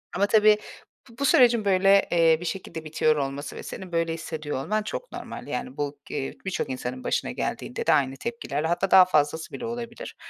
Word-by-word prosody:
Ama 195 +3 +3
tabii, 215 0 +5 0.5
bu 230 - -17
bu 280 - 0
sürecin, 240 -5 +5
böyle, 195 0 +4
eee, 165 -2 +5
bir 175 - -7
şekilde 170 -3 -5
bitiyor 155 0 +2
olması 140 0 -4
ve - - -8
senin 185 -2 -8
böyle 165 -1 0
hissediyor 155 -4 -4
olman 215 +6 -1
çok - - -6
normal. - - -8
Yani, 255 +1 -5
bu 145 0 -3
g - - -7
eee, 135 -1 -3
birçok 190 -6 -2
insanın 130 0 -5
başına - - -1
geldiğinde - - -4
de - - +6
aynı 135 -1 +2
tepkilerle, 160 -10 -3
hatta 175 +3 0
daha 185 -1 +9
fazlası 155 -2 0
bile 240 - -5
olabilir. 235 0 -6
175 Hz, 200 wpm, -25 LUFS, 150-215 Hz, 0.5 s, daha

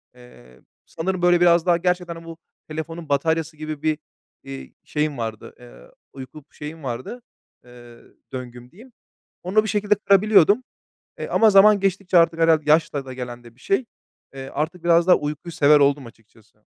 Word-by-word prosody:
Eee, 65 - -18 0.2
sanırım, 185 +2 -4
böyle, 175 0 +3
biraz 170 -1 +4
daha 175 -1 +3
gerçekten 175 -1 -3
bu 165 -1 -10 0.3
telefonun 160 +1 -7
bataryası 160 +2 -1
gibi 155 -1 -6
bir, 155 -1 0 0.5
iii, 65 -1 -10
şeyim 150 -2 -2
vardı, 110 -2 -6
eee, - - -16 0.2
uyku 135 +3 -11
şeyim 150 +1 -9
vardı, 130 - -6 0.4
eee, 120 -1 -15 0.4
"döngüm" 125 0 -9
diyeyim. 235 +7 -17 0.5
Onu 200 +5 +2
bir - - -4
şekilde 210 0 +1
kırabiliyordum. 205 +2 +3 0.6
Eee, - - -4
ama 220 -1 +4
zaman 205 +1 +6
geçtikçe 195 -1 0
artık 165 0 +3
herhâlde 160 -2 +2
yaşla 150 -3 +2
da 130 - -8
gelen 120 -1 -8
de 120 0 -16
bir - - -27
şey. 215 +6 0 0.5
Eee, 135 0 -8
artık 160 +4 -4
biraz 170 +1 +3
daha 180 - +7
uykuyu 150 +3 -5
sever 150 -2 +4
oldum 140 -1 +2
açıkçası. 110 -1 -20
155 Hz, 160 wpm, -22 LUFS, 130-175 Hz, 0.6 s, daha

